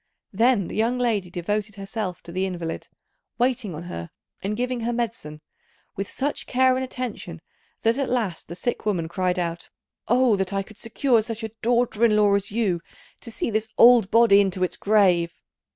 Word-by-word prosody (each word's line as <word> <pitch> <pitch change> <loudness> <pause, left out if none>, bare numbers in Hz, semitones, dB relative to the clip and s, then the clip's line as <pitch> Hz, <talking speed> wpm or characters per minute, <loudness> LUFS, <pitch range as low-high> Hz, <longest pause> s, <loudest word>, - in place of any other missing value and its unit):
Then 225 -2 +3
the - - -7
young 230 +3 +1
lady 220 -7 0
devoted 205 +4 -3
herself 195 -2 -5
to 170 - -9
the 185 +2 -1
invalid, 175 -3 -5 0.5
waiting 245 -7 0
on 160 - -7
her 85 - -7 0.3
and 210 +2 -3
giving 250 0 -1
her 235 +1 -1
medicine 225 -11 -4 0.5
with 195 +1 -4
such 285 +2 -3
care 260 0 +3
and 260 - -1
attention 245 -10 -6 0.4
that 230 +4 +2
at 275 - -1
last 220 -9 -2
the 170 - -7
sick 240 +7 -3
woman 180 -6 -1
cried 180 +1 -1
out, 170 -1 -3 0.4
"Oh, 245 -1 +4
that 190 0 -2
I 195 0 0
could 215 +2 -16
secure 235 +1 +2
such 225 0 -5
a 220 - -4
daughter 235 -1 +1
in 225 -2 +5
law 205 -1 +4
as 200 0 0
you, 205 -6 0 0.4
to - - -9
see 230 - -3
this 220 +1 -1
old 235 -4 +7
body 225 -3 +6
into 190 -2 -1
its 180 - -1
grave!" 185 -5 +2
210 Hz, 185 wpm, -24 LUFS, 185-235 Hz, 0.5 s, old